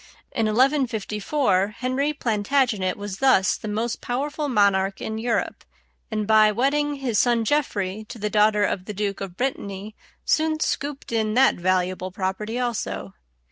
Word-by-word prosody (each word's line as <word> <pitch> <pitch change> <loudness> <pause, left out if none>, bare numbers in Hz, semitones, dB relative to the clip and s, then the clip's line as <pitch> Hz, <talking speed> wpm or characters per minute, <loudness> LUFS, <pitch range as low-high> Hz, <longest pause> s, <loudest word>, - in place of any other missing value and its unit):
In 225 -3 0
1154, 220 -4 +1
Henry 255 +4 0
Plantagenet 225 -6 0
was 205 -1 -6
thus 260 -8 +4
the - - -7
most 220 +3 -2
powerful 290 +4 -2
monarch 200 -4 +2
in 220 0 -4
Europe, 235 0 -1 0.5
and 215 -1 -2
by 215 0 +5
wedding 290 +6 +1
his 250 -7 -1
son 235 -2 +2
Geoffrey 215 -7 -1
to 240 - -8
the 210 -1 -2
daughter 210 0 +4
of 185 -2 -1
the 210 - -6
Duke 200 -1 -2
of 185 -2 -6
Brittany, 210 -5 -3 0.3
soon 315 0 +1
scooped 285 -4 -3
in 220 -1 0
that 265 +2 +5
valuable 185 +1 0
property 195 +5 -3
also. 100 - -3
220 Hz, 145 wpm, -24 LUFS, 200-260 Hz, 0.5 s, by